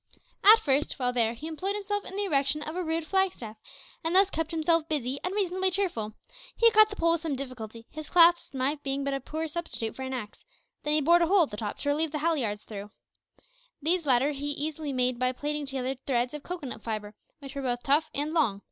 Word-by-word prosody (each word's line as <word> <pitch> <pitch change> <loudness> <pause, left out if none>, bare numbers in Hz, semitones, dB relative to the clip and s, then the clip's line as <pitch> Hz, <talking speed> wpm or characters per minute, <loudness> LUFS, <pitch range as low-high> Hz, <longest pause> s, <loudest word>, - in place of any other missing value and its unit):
At 435 +3 +9
first, 285 -4 +1
while 250 -2 0
there, 235 -1 +1
he 290 - -9
employed 370 +6 -2
himself 410 0 -3
in 385 - -7
the 410 - 0
erection 285 -3 +1
of 310 +2 -6
a 365 - -1
rude 325 0 -1
flag 380 +1 +2
staff, 220 -2 -9 0.5
and 325 +2 0
thus 390 +1 +5
kept 325 0 -2
himself 330 0 +1
busy 275 -3 -1
and 365 +2 -2
reasonably 375 -2 +1
cheerful. 345 - -2 0.4
He 465 0 +5
cut 430 -1 +6
the 415 - -7
pole 335 -3 +2
with 335 -1 +1
some 320 -4 -2
difficulty, 230 -4 -7
his 310 -1 -8
clasp 345 -4 +5
knife 275 +3 0
being 275 0 -2
but 280 0 -1
a 275 - -1
poor 315 +4 -4
substitute 310 -8 -4
for - - -8
an 260 0 -4
axe; 210 -4 -7 0.4
then 295 +1 0
he 305 - +3
bored 340 +4 +5
a 340 - +3
hole 380 0 +5
at 300 - -4
the 210 - -6
top 210 -1 -4
to 285 0 0
reave 315 0 -1
the 305 - -2
halliards 275 -10 -1
through. 205 -1 -8 0.9
These 330 +1 0
latter 265 +2 +3
he 285 0 -4
easily 295 +1 -3
made 250 -2 0
by 255 0 +1
plaiting 295 +2 -3
together 265 -1 -2
threads 245 -1 +1
of 300 - -6
cocoanut 315 -6 -6
fibre, 215 -2 -4 0.2
which 275 -2 -10
were 280 - -4
both 245 -2 -2
tough 300 +3 +3
and 295 +2 -1
long. 220 -12 +2
295 Hz, 230 wpm, -28 LUFS, 255-335 Hz, 0.9 s, At